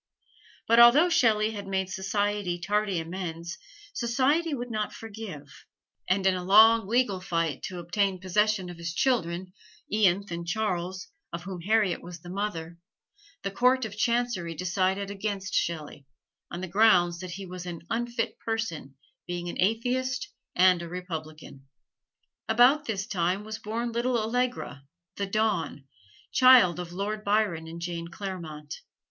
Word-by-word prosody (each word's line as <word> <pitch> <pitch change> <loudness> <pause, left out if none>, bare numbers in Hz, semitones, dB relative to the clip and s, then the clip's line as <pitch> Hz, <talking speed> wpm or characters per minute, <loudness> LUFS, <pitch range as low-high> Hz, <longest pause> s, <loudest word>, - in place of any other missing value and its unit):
But 230 +1 +5
although 265 +9 +8
Shelley 220 -9 +3
had 200 -2 -7
made 190 -1 -1
society 205 -1 -1
tardy 200 0 0
amends, 170 +1 -5 0.3
society 270 +8 +1
would 245 -1 -5
not 215 -1 -2
forgive; 200 -11 -9 0.4
and 190 +1 +2
in 190 - +5
a 180 -1 -3
long 220 +3 +6
legal 225 -4 +1
fight 165 -5 -1
to 185 - -6
obtain 185 +2 0
possession 190 0 +1
of 175 - -11
his 170 0 -4
children, 185 -8 0 0.4
Ianthe 200 -2 +2
and 170 0 -5
Charles, 185 -2 -2 0.2
of 170 +1 -5
whom 180 -1 -6
Harriet 210 0 +2
was 175 -1 -9
the 175 - -9
mother, 175 -4 -4 0.6
the 195 - -2
Court 250 +4 +3
of 205 -2 -7
Chancery 235 -7 0
decided 190 +3 0
against 200 -1 -4
Shelley, 150 -4 -2 0.4
on 175 - -6
the 185 - -4
grounds 175 -3 +4
that 185 -1 -6
he 195 +2 -7
was 180 -1 -8
"an 170 -2 -6
unfit 235 0 -2
person, 215 -12 -4 0.3
being 175 0 -4
an - - -3
atheist 255 - 0 0.3
and 180 -1 +5
a 170 - -7
republican." 155 -6 -7 0.8
About 250 +7 +5
this 200 -6 -2
time 185 -1 -1
was 220 +1 -6
born 230 +3 -3
little 240 +1 0
Allegra, 235 - -2 0.3
"the 200 - -2
Dawn," 205 -9 -1 0.5
child 250 -10 +6
of 175 -1 -6
Lord 205 +4 -3
Byron 200 -6 +1
and 165 +1 -8
Jane 170 -1 -4
Clairmont. 170 -5 -7
195 Hz, 145 wpm, -27 LUFS, 175-220 Hz, 0.8 s, although